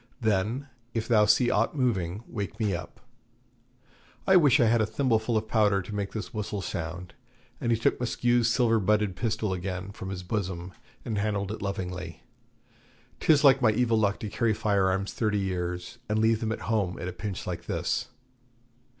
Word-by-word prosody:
Then, 110 +4 0 0.3
if 115 -1 -1
thou 110 -3 +5
see 120 +3 +4
aught 115 +7 +1
moving, 105 -6 0
wake 100 0 -5
me 105 -3 +1
up. 85 - -7 1.2
I 190 - +5
wish 145 -8 +6
I 120 - +5
had 115 0 +3
a 110 - +1
thimbleful 115 -3 +1
of 110 0 -2
powder 105 -3 +2
to 105 - -8
make 100 -1 -3
this 110 -3 -6
whistle 105 -2 -3
sound' 85 +2 -5 0.5
and 120 - 0
he 115 - +3
took 115 - +1
Maskew's 120 -1 +2
silver 115 -1 +3
butted 105 -1 +1
pistol 110 -2 -1
again 95 +1 -4
from 100 -2 -7
his 95 -2 -5
bosom, 90 -2 -3 0.3
and 110 -3 -2
handled 100 -1 -1
it 110 - -6
lovingly, 90 -4 -5 1.0
'tis 155 -2 +4
like 135 -2 +6
my 120 - +5
evil 115 +1 +2
luck 100 -2 +1
to 105 - -4
carry 110 0 +1
fire 100 -3 +2
arms 95 +1 -1
thirty 105 -2 0
years, 90 +2 -3
and 105 - +1
leave 110 0 +3
them 110 -1 -2
at 115 - -4
home 100 -5 -1
at 90 - -5
a 90 - -4
pinch 100 0 -5
like - - -5
this.' - - -1
105 Hz, 185 wpm, -27 LUFS, 95-115 Hz, 1.2 s, wish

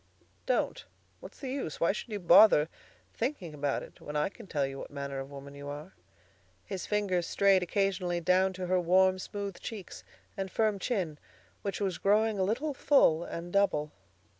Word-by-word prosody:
"Don't. - - 0 0.4
What's - - -12
the 265 -2 -5
use? 265 - -4
Why 170 - +3
should 215 - -6
you 210 -2 -3
bother 170 -3 +7 0.4
thinking 225 - -3
about 145 -1 -1
it - - -14
when 150 - -7
I 150 +4 +1
can 215 +1 -13
tell 145 -6 0
you 135 0 -6
what - - -7
manner 140 -1 -5
of 135 0 -6
woman 140 0 -10
you 140 0 -9
are." 145 -7 -7 0.7
His 190 -2 -5
fingers 195 -5 0
strayed 195 -1 +4
occasionally 180 -1 0
down 185 +2 +3
to 185 0 -5
her 185 +1 +2
warm, 185 +2 +4
smooth 200 0 -5
cheeks 205 -6 -8 0.3
and 195 -2 -3
firm 215 0 +1
chin, 180 - -2 0.4
which 200 -2 -3
was 195 -4 -1
growing 210 +1 +2
a - - +3
little 255 +10 -1
full 210 - +4
and 175 0 -7
double. 150 -7 +2
185 Hz, 180 wpm, -30 LUFS, 155-205 Hz, 0.7 s, bother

